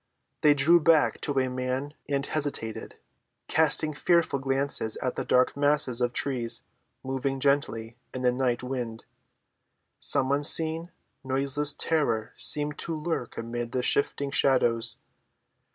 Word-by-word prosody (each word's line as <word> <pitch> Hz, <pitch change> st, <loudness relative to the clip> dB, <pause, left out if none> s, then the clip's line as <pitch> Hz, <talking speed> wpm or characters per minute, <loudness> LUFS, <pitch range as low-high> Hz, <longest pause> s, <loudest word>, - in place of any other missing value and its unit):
They 150 Hz, -1 st, +5 dB
drew 160 Hz, +5 st, +5 dB
back 160 Hz, -1 st, +3 dB
to 145 Hz, -2 st, -1 dB
a 130 Hz, -, 0 dB
man 130 Hz, +3 st, -3 dB, 0.2 s
and 140 Hz, -1 st, -1 dB
hesitated, 140 Hz, -8 st, -4 dB, 0.5 s
casting 155 Hz, 0 st, +2 dB
fearful 165 Hz, -2 st, +1 dB
glances 135 Hz, -4 st, 0 dB
at 130 Hz, -, -3 dB
the -, -, -3 dB
dark 125 Hz, 0 st, +2 dB
masses 145 Hz, -4 st, +2 dB
of 120 Hz, -1 st, +1 dB
trees 120 Hz, -3 st, 0 dB, 0.4 s
moving 135 Hz, +1 st, -3 dB
gently 120 Hz, -5 st, -1 dB
in 130 Hz, -, -6 dB
the 125 Hz, -, +3 dB
night 125 Hz, -1 st, -1 dB
wind. 125 Hz, -3 st, -5 dB, 0.9 s
Some 130 Hz, 0 st, +1 dB
unseen, 160 Hz, +3 st, +2 dB, 0.3 s
noiseless 140 Hz, +2 st, +1 dB
terror 120 Hz, -9 st, -1 dB
seemed 150 Hz, 0 st, 0 dB
to 165 Hz, -, -4 dB
lurk 155 Hz, -6 st, -4 dB
amid 120 Hz, +1 st, -5 dB
the 125 Hz, -, -1 dB
shifting 140 Hz, +1 st, 0 dB
shadows. 120 Hz, -5 st, +2 dB
135 Hz, 130 wpm, -27 LUFS, 125-145 Hz, 0.9 s, They